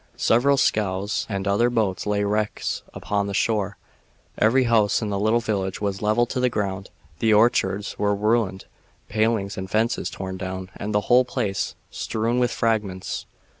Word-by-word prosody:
Several 135 +5 +3
scows 100 -4 0
and 100 -2 -2
other 105 +5 +3
boats 105 -6 -1
lay 105 0 +1
wrecks 105 +1 -1
upon 100 -1 -2
the 100 - -3
shore, 100 -2 0 0.6
every 125 +5 +3
house 115 -4 +3
in 110 - -3
the 100 - -1
little 110 +3 +2
village 95 -5 -2
was 100 -2 -2
leveled 110 +3 +2
to - - -1
the 125 0 +3
ground, 95 -3 -3 0.3
the 110 +2 +2
orchards 105 -2 +2
were 100 0 +2
ruined, 105 -2 0 0.4
palings 110 -2 0
and 95 0 -6
fences 110 +4 0
torn 95 -1 -6
down, 95 0 -5
and 105 - -4
the 105 0 +2
whole 125 +5 +5
place 100 -5 -2 0.2
strewn 115 +3 -1
with 125 -1 +2
fragments. 105 -6 -2
105 Hz, 165 wpm, -24 LUFS, 100-115 Hz, 0.6 s, whole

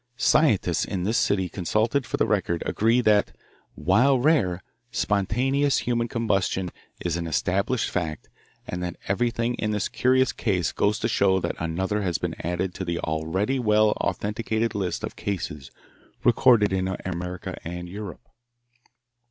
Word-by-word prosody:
Scientists 105 - +3
in 95 -3 -3
this 110 +5 0
city 95 -2 +1
consulted 110 +9 0
for - - -2
the - - +2
Record 90 -5 0
agree 115 +3 +2
that, 105 -3 +2 0.4
while 135 +3 +3
rare, 120 - +2 0.3
spontaneous 130 +10 +1
human 120 -1 0
combustion 95 -6 0 0.3
is 85 -1 0
an 85 -1 -3
established 100 - 0
fact 80 -5 -3 0.4
and 90 - -5
that 90 -1 -3
everything 115 +3 0
in 105 - 0
this 105 -2 0
curious 130 0 +2
case 95 -7 0
goes 105 +1 +1
to - - -1
show 95 -1 +3
that - - -2
another 95 +6 -1
has 90 -5 0
been - - -3
added 90 +2 -2
to 95 - -5
the 85 -2 -2
already 85 - -1
well 105 -2 +4
authenticated 110 +2 -1
list 95 -4 -2
of - - -4
cases 75 -8 -4 0.5
recorded 115 -4 +5
in 95 0 0 0.2
America 90 0 -4
and 90 +1 -6
Europe. 100 -1 -8
100 Hz, 145 wpm, -25 LUFS, 90-115 Hz, 0.5 s, recorded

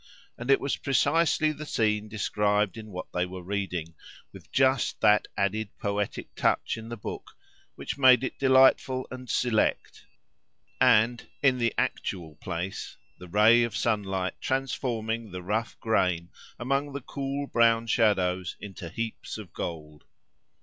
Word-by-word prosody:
and 120 +3 -8
it 135 - +6
was 140 - -2
precisely 155 +2 +2
the 155 0 -7
scene 105 -6 0
described 105 -1 0
in 110 -1 -8
what 90 -2 -6
they 90 - +1
were 90 0 -6
reading, 90 -4 -3 0.4
with - - -14
just 130 -2 +2
that 105 0 +4
added 100 +2 0
poetic 100 0 -3
touch - - +1
in 115 0 -9
the 120 - -5
book - - -8 0.4
which - - -6
made 130 -2 +7
it 130 - -4
delightful 130 -1 +4
and 130 -1 -8
select, 120 -4 0 0.7
and, 120 0 +4 0.2
in 130 -2 +4
the 115 -1 +2
actual 80 -4 -2
place, 95 +1 -5 0.2
the 90 - -10
ray 110 +6 +5
of 115 -3 -1
sunlight 95 -4 -1
transforming 115 -4 -2
the 90 -1 -7
rough 110 +5 -2
grain 90 -6 0 0.3
among 135 +3 -1
the 140 - -5
cool 140 +2 -4
brown 115 -3 +3
shadows 95 -6 +1
into 95 -4 -8
heaps 115 +4 -5
of 105 -6 -10
gold. 75 -3 -6
110 Hz, 145 wpm, -27 LUFS, 95-130 Hz, 0.7 s, made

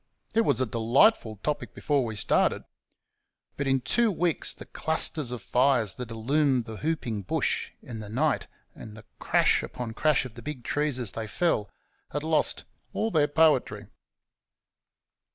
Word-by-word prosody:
It 225 - +4
was 140 - +1
a 130 - +2
delightful 115 - +3
topic 150 -1 -3
before 145 -3 0
we 110 -2 -4
started,; 105 - +2 0.9
but 140 - -3
in 135 -1 +2
two 225 - +2
weeks 175 -3 +1
the - - -6
clusters 160 -3 +1
of 125 -3 -4
fires 125 -6 +2
that 125 -2 -7
illumined 130 +2 +1
the 110 -2 -7
whooping 135 -9 -2
bush 95 - -1
in 115 -2 -7
the 105 -1 -8
night, 140 +6 0 0.3
and 110 0 -11
the 110 - -13
crash - - +2
upon 120 -2 -6
crash 150 +2 +2
of 125 - -9
the 120 - -11
big 145 -3 -6
trees 145 -1 -1
as 115 -6 -2
they 110 +2 -5
fell, 110 - 0 0.4
had 145 +1 -4
lost 160 0 +1 0.3
all 225 +1 -1
their 150 -4 +3
poetry. 130 -10 +2
130 Hz, 160 wpm, -27 LUFS, 115-150 Hz, 0.9 s, It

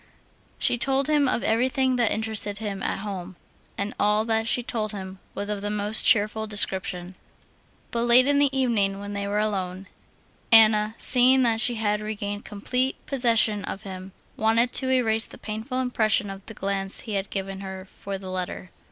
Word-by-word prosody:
She 240 - +1
told 270 +2 +3
him 295 -2 +3
of 235 - 0
everything 255 +3 +1
that 235 -3 +2
interested 215 -2 -1
him 205 -3 -5
at - - -2
home; 190 -3 -6 0.4
and 200 +1 -3
all 210 +1 +2
that 225 0 0
she 245 - +1
told 215 -3 -3
him 190 -1 -8 0.2
was 205 - -4
of 205 -1 -3
the 205 - -3
most 210 +1 +2
cheerful 220 -1 +2
description. 190 -3 0 0.8
But 235 0 -1
late 240 +2 +6
in 285 0 +2
the 285 -1 +4
evening, 225 -7 0
when 205 0 -7
they 200 0 -3
were 205 +1 -1
alone, 195 -3 -2 0.7
Anna, 215 -1 +5
seeing 255 +1 +4
that 225 -2 +2
she 240 -1 +1
had 210 -1 -1
regained 205 -1 -5
complete 250 +6 -2
possession 230 -6 +2
of 195 - -6
him, 190 -1 -8 0.3
wanted 230 +3 +2
to 260 - +2
erase 225 -4 +2
the - - -12
painful 220 +5 -5
impression 215 -5 +1
of 195 0 -10
the 220 - -9
glance 195 -1 -2
he 220 - -6
had 195 0 -2
given 195 -1 -4
her 190 -1 -7
for 195 +1 -9
her - - -2
letter. 185 -1 -5
215 Hz, 180 wpm, -25 LUFS, 200-235 Hz, 0.8 s, late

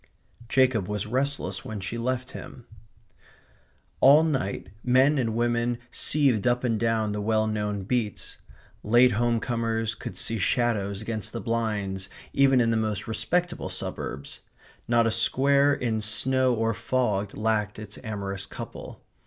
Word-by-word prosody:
Jacob 125 -7 +3
was 105 -1 -2
restless 135 +3 -1
when 110 -6 -6
she 95 +4 -4
left 125 +2 -2
him. 120 - -10 1.3
All 145 +4 +7
night 130 - -2
men 130 +4 +4
and 115 -3 -1
women 120 0 0
seethed 135 -7 +2
up 125 +1 +1
and 115 -3 0
down 115 -2 +1
the 105 0 -3
well 110 +1 +1
known 105 -2 -2
beats. 110 0 -3 0.4
Late 120 +4 +5
home 120 +1 +1
comers 115 -2 -1
could - - -8
see 115 -1 -1
shadows 105 -1 0
against 110 -2 -4
the 115 - -3
blinds 105 -5 -2 0.2
even 135 -2 +4
in 115 -1 +3
the 115 - +1
most 110 -1 -2
respectable 175 +10 -1
suburbs. 70 +1 -5 0.5
Not 120 0 +3
a 115 - +2
square 140 +5 +3
in 115 -5 -1
snow 130 +4 +2
or 115 0 0
fog 105 -5 -1
lacked 105 -1 0
its 105 -1 -8
amorous 100 -3 -5
couple. - - -9
115 Hz, 145 wpm, -26 LUFS, 105-125 Hz, 1.3 s, All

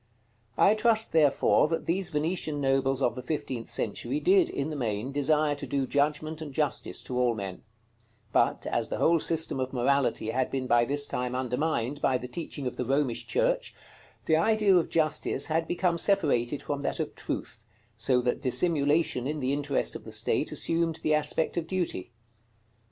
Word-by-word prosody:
I 205 - +5
trust, 220 0 +1
therefore, 150 -2 +3
that 165 +1 -2
these 185 +2 0
Venetian 155 -1 -2
nobles 135 0 +1
of 120 - +2
the 125 - -6
fifteenth 130 -4 -4
century 115 - -2
did, 370 +1 +4
in 140 +3 -3
the - - -4
main, 115 -1 -2
desire 150 +1 +2
to 145 - -6
do 140 -1 -1
judgment 150 +3 -1
and 150 -2 -6
justice 145 +1 -1
to 125 -1 -3
all 120 -2 +2
men; 95 -3 -6 0.7
but, - - +2
as - - -1
the - - -3
whole 165 0 +3
system 160 -4 +1
of 130 0 -2
morality 125 -3 +1
had 130 +2 0
been 130 -1 -3
by 120 -1 +3
this 145 +2 +2
time 125 -1 -3
undermined 130 +1 -1
by 130 - +2
the 125 - -7
teaching 145 0 -6
of 125 - -4
the 125 - -2
Romish 135 -2 0
Church, - - 0 0.5
the 160 - +3
idea 210 +2 +3
of 175 - +2
justice 155 -3 0
had 165 +1 -1
become 175 -1 0
separated 145 - +1
from 145 -1 -3
that - - -2
of - - -3
truth, - - -6 0.3
so 125 +3 +1
that 125 0 -1
dissimulation 145 -2 +2
in 150 +1 -3
the 130 0 -1
interest 145 0 -1
of - - -7
the - - -10
state - - 0
assumed 165 -1 0
the 155 - +2
aspect 150 +2 +1
of 165 -1 -2
duty. 175 - -3
145 Hz, 180 wpm, -28 LUFS, 130-165 Hz, 0.7 s, I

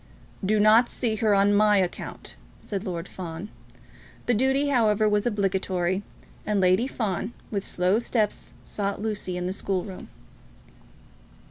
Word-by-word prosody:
"Do 210 +3 +2
not 220 +3 +6
see 225 -3 0
her 215 -1 +3
on 200 +1 +4
my 210 0 +5
account," 185 -2 -3 0.2
said 200 0 -5
Lord 175 0 -4
Fawn. 175 +2 -7 0.8
The 245 - +2
duty, 265 +5 +2
however, 215 -5 +3
was 210 +2 +2
obligatory, 190 -3 0 0.4
and 210 -1 0
Lady 185 +6 +3
Fawn 215 -3 -3 0.2
with 200 -3 -1
slow 185 +4 +1
steps 220 -3 -1
sought 200 -1 -3
Lucy 205 -4 -3
in 180 - -3
the 185 - -2
school 190 -2 -2
room. 190 -3 -9
205 Hz, 140 wpm, -26 LUFS, 190-220 Hz, 0.8 s, not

